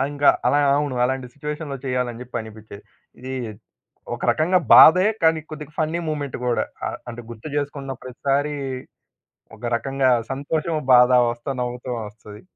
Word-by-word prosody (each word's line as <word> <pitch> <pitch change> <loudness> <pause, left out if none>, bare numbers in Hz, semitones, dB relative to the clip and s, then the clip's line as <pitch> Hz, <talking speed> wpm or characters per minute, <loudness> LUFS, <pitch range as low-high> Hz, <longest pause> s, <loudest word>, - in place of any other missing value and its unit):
ఆ! - - +3
ఇంకా 145 0 +2 0.2
అలాగ 145 0 +3
ఆ! - - +5
అవును. 145 -3 -1
అలాంటి 130 0 -1
సిచ్యుయేషన్‌లో 150 0 -5
చేయాలనిజెప్పి 125 -1 -3
అనిపిచ్చేది. 110 -2 -11 0.4
ఇది 130 +1 -6 0.8
ఒక - - -9
రకంగా 175 +4 +2 0.2
బాధే 180 +5 +9 0.2
కానీ 160 -1 +4
కొద్దిగా 155 -1 -8
ఫన్నీ 160 +2 0
మూమెంట్ 145 -3 -3
గూడా. 120 -1 +1 0.2
ఆహ్, - - -4
అంటే 120 +1 -8
గుర్తుచేసుకున్న 140 +3 -4
ప్రతిసారి 140 +3 -1 1.0
ఒక 120 - -20
రకంగా 135 +2 0 0.2
సంతోషము, 155 +3 -2
బాధ 125 0 +7 0.2
వస్తా 120 +3 -5
నవ్వుతోనొస్తది. 115 -4 -6
135 Hz, 135 wpm, -22 LUFS, 125-150 Hz, 1.0 s, బాధే